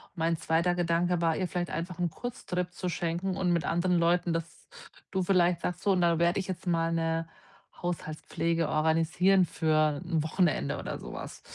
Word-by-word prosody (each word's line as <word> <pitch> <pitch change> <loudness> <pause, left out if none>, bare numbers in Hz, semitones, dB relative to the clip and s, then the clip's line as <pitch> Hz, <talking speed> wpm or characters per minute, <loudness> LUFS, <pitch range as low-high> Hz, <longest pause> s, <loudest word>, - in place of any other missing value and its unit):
Mein 165 -1 0
zweiter 170 +3 +1
Gedanke 175 0 +1
war, 165 -1 +2
ihr 185 - -1
vielleicht 175 0 -3
einfach 170 +2 -4
’n 175 -1 +1
Kurztrip 180 -5 -4
zu 180 - -4
schenken 175 +3 -2
und 180 -2 +1
mit 170 0 +1
anderen 175 +1 +1
Leuten, 170 +1 +2
dass 165 0 -5 0.4
du 190 -1 0
vielleicht 175 -2 +3
sagst: 180 +1 -3
„So, 200 - +3
und 180 - +1
da 170 -1 +3
werde 170 +2 +3
ich 190 - -4
jetzt 185 -1 -5
mal 165 -1 +1
’ne 165 0 0 0.5
Haushaltspflege 165 -1 -2
organisieren 165 +4 +3
für 155 -1 +1
’n 165 -3 0
Wochenende 155 - +1
oder - - -5
so - - -8
was.“ - - -7
170 Hz, 180 wpm, -29 LUFS, 165-180 Hz, 0.5 s, vielleicht